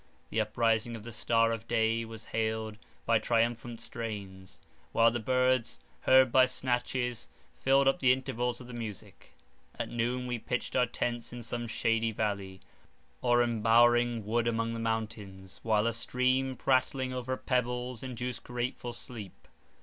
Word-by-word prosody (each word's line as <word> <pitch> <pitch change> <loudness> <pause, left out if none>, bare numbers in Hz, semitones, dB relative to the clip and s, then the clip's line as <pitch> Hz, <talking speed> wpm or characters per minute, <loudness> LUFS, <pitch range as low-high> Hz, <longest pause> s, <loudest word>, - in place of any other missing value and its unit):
The 110 - +2
uprising 115 +1 +1
of 110 - -9
the 120 - -8
star 115 0 +2
of 115 0 -4
day 115 0 +1
was 110 -1 -10
hailed 110 -1 -2 0.3
by 115 -1 +4
triumphant 115 +1 0
strains, 95 -5 -7 0.3
while 115 0 +5
the 120 - -2
birds, 130 0 +1 0.2
heard 130 -1 +5
by 130 0 +6
snatches, 125 - -1 0.2
filled 135 +1 +3
up 135 - +3
the 130 -2 +5
intervals 125 -2 -1
of 125 - -10
the 125 - -10
music. 110 -4 -8 0.4
At - - -3
noon, 120 +2 -1
we 120 -1 -2
pitched 125 +2 -3
our 125 -1 +3
tents 120 0 -3
in 120 0 -7
some 120 +1 -4
shady 115 0 +1
valley, 100 -3 -3 0.6
or 120 0 +4
embowering 120 0 +3
wood 115 +2 +1
among 115 0 0
the 115 - -4
mountains, 105 -4 -4
while 110 -1 +2
a 115 - +1
stream 130 +3 +1
prattling 130 0 +1
over 130 +1 -3
pebbles 125 -1 -1
induced 125 -1 -5
grateful 120 0 -4
sleep. 115 -5 -9
120 Hz, 150 wpm, -30 LUFS, 110-125 Hz, 0.6 s, by